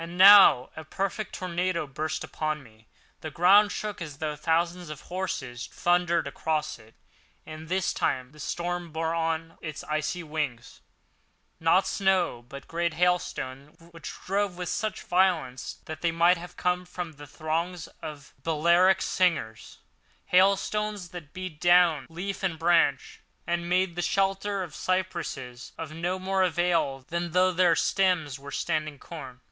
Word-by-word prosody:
And 170 +1 -8
now 190 -9 +8
a 160 - -7
perfect 195 +6 -3
tornado 180 -2 -1
burst 155 +3 -3
upon 155 -2 -3
me. 110 -2 -20 0.3
The 155 - -6
ground 195 +6 +5
shook 210 -3 -4
as 150 -4 -6
though 150 0 -3
thousands 170 +3 0
of 155 -2 -7
horses 145 -10 -4
thundered 175 -1 +1
across 155 -5 -2
it; 110 0 -19 0.5
and 155 +1 -9
this 185 0 0
time 130 0 -1
the 150 - -17
storm 175 +2 -3
bore 160 +1 -1
on 165 0 -2
its 155 -2 -6
icy 155 +3 -2
wings, 150 -7 -4 0.8
not 165 +4 +4
snow, 185 - +1
but 140 0 -10
great 170 -1 -1
hailstones 150 -5 -1 0.2
which 165 - -7
drove 195 -1 0
with 180 -2 -4
such 215 +1 -2
violence 175 -9 0
that 155 - -7
they 170 - +1
might 170 +2 +4
have 175 0 -11
come 180 0 0
from 180 -1 -6
the 145 -1 -12
thongs 160 +4 -3 0.2
of 150 -2 -9
Balearic 170 +4 +4
slingers—hailstones 185 - 0
that 170 -4 -10
beat 185 -5 -7
down 175 -4 +4
leaf 185 +4 -5
and 180 -4 -1
branch 170 +1 +2 0.2
and 170 0 -2
made 180 -1 +1
the 175 - -2
shelter 195 +2 0
of 175 - -8
the - - -10
cypresses 170 -9 -3
of 160 -2 -6
no 175 +3 -2
more 190 +1 0
avail 170 -7 +1
than 170 -1 -3
though 185 +1 +4
their 175 -2 +4
stems 180 -8 +1
were 140 +1 -10
standing 155 -1 -2
corn. 135 -5 -9
170 Hz, 150 wpm, -27 LUFS, 155-180 Hz, 0.8 s, now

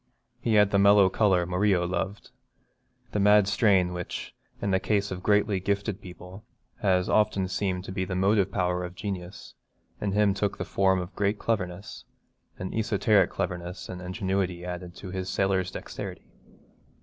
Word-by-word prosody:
He 115 - +1
had 105 -1 +5
the 100 - +3
mellow 100 -1 +6
colour 95 -3 +2
Murillo 90 0 +1
loved. 95 +3 -4 0.8
The 105 - -1
mad 105 0 +5
strain 95 -4 +3
which, 90 -1 -6 0.3
in 100 - -1
the 95 - +3
case 100 0 0
of 90 -1 -5
greatly 105 0 +2
gifted 100 +2 -2
people, 90 +2 -11 0.4
has 95 -3 +2
often 100 -3 +2
seemed 95 -1 -2
to 95 - -7
be 95 0 -2
the 95 0 -4
motive 95 +1 +2
power 90 -2 0
of 90 0 -7
genius, 95 -2 -6 0.5
in 100 -2 -1
him 105 -1 +3
took 100 0 -2
the - - -4
form 95 -1 +2
of 90 -1 -5
a - - -33
great 100 +1 0
cleverness, 95 -5 -3 0.5
an 95 - -5
esoteric 105 -3 +2
cleverness 90 -1 -4
and 90 -1 -6
ingenuity 95 -1 -2
added 90 -1 -6
to 95 - -8
the 95 0 -3
sailor's 95 -1 0
dexterity. - - -7
95 Hz, 165 wpm, -27 LUFS, 90-100 Hz, 0.8 s, mellow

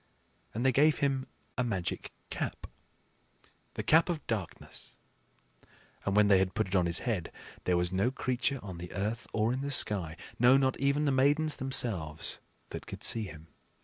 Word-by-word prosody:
And 120 +3 -2
they 130 - +5
gave 150 +4 +4
him 135 -1 -1 0.3
a - - +3
magic 95 -8 -3 0.2
cap, - - -4 1.1
the - - -3
Cap 165 +3 +4
of 160 -4 -3
Darkness; 105 -7 -6 1.1
and 100 - +1
when 105 0 +5
they 100 -2 +5
had 95 +2 -1
put 110 -1 +1
it 95 - -8
upon 90 -3 +3
his 85 - +1
head, 110 -9 -2 0.3
there 90 -1 +2
was 90 0 +1
no 95 +6 +1
creature 130 +1 -1
on 95 -4 -8
the 90 0 -8
earth 110 +4 -3
or 110 +2 +1
in 130 - -3
the 140 - -3
sky 95 - +3 0.2
no, 125 +3 +6
not 130 -1 +1
even 140 +2 +1
the 140 - +2
Maidens 145 +4 +2
themselves 100 -12 0 0.3
that - - -8
could - - -8
see 115 -2 +4
him. 80 -3 -12
115 Hz, 180 wpm, -30 LUFS, 95-135 Hz, 1.1 s, no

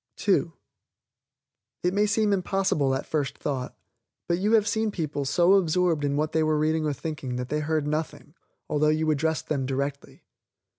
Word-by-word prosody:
(2) - - +1 1.3
It 180 +1 +1
may 205 +1 +2
seem 210 0 +2
impossible 185 -8 +1
at 135 - -4
first 145 -4 -2
thought, 135 -4 -4 0.5
but 170 0 +1
you 210 +4 +1
have 215 -1 +4
seen 220 -1 0
people 155 -7 -3
so 175 +7 +4
absorbed 175 -4 +2
in 140 0 0
what 150 +1 0
they 160 - +1
were 155 -1 +2
reading 155 +1 +1
or 150 - 0
thinking 140 -3 -5
that 125 0 -4
they 150 - 0
heard 155 0 -1
nothing, 150 0 -4 0.3
although 150 0 +1
you 155 0 +1
addressed 160 +2 -1
them 135 -4 -1
directly. 140 +1 -4
155 Hz, 170 wpm, -26 LUFS, 145-180 Hz, 1.3 s, have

